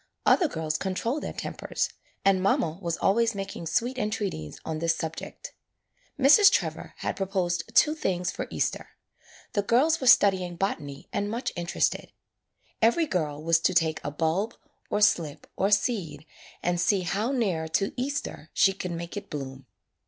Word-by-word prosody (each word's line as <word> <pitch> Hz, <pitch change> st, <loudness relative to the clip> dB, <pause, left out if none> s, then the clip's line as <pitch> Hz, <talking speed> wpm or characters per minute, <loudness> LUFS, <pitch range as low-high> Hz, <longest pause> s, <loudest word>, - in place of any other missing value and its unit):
Other 350 Hz, -, +5 dB
girls 160 Hz, -, -2 dB
controlled 230 Hz, +9 st, -2 dB
their -, -, -4 dB
tem -, -, -5 dB
pers. -, -, -2 dB, 0.4 s
And 195 Hz, -1 st, +4 dB
mamma 170 Hz, -3 st, +1 dB
was 170 Hz, -2 st, -2 dB
always 230 Hz, +2 st, +2 dB
making 195 Hz, -4 st, -5 dB
sweet 245 Hz, +10 st, 0 dB
entreaties 205 Hz, -, -3 dB
on 160 Hz, -1 st, -3 dB
this 165 Hz, 0 st, +1 dB
subject. 160 Hz, 0 st, -6 dB, 0.7 s
Mrs. 345 Hz, +9 st, +7 dB
Trevor -, -, -2 dB
had -, -, -3 dB
proposed 185 Hz, -3 st, -1 dB
two 305 Hz, -, +6 dB
things 180 Hz, -, -1 dB
for -, -, -5 dB
Easter. -, -, -2 dB, 0.6 s
The 205 Hz, -, +2 dB
girls 280 Hz, +10 st, +3 dB
were 260 Hz, -, -1 dB
studying 190 Hz, -7 st, +5 dB
botany 150 Hz, -6 st, -3 dB
and 205 Hz, 0 st, -1 dB
much 235 Hz, +4 st, -3 dB
interested. 175 Hz, +1 st, -1 dB, 0.7 s
Every 235 Hz, +9 st, +4 dB
girl 155 Hz, -, -2 dB
was 165 Hz, 0 st, +4 dB
to 185 Hz, +2 st, +1 dB
take 160 Hz, -2 st, +2 dB
a -, -, -2 dB
bulb, 165 Hz, +8 st, -1 dB, 0.3 s
or 210 Hz, -, 0 dB
slip, 165 Hz, -8 st, +2 dB
or 195 Hz, -, +1 dB
seed 195 Hz, -, 0 dB, 0.4 s
and 175 Hz, 0 st, +1 dB
see 200 Hz, 0 st, +2 dB
how 205 Hz, +7 st, -1 dB
near 190 Hz, -12 st, 0 dB
to 195 Hz, +5 st, 0 dB
Easter 260 Hz, -, -4 dB
she 195 Hz, -, +5 dB
could 185 Hz, -2 st, -5 dB
make 170 Hz, 0 st, -6 dB
it 205 Hz, -1 st, -6 dB
bloom. 135 Hz, -2 st, -7 dB
190 Hz, 160 wpm, -27 LUFS, 165-220 Hz, 0.7 s, Mrs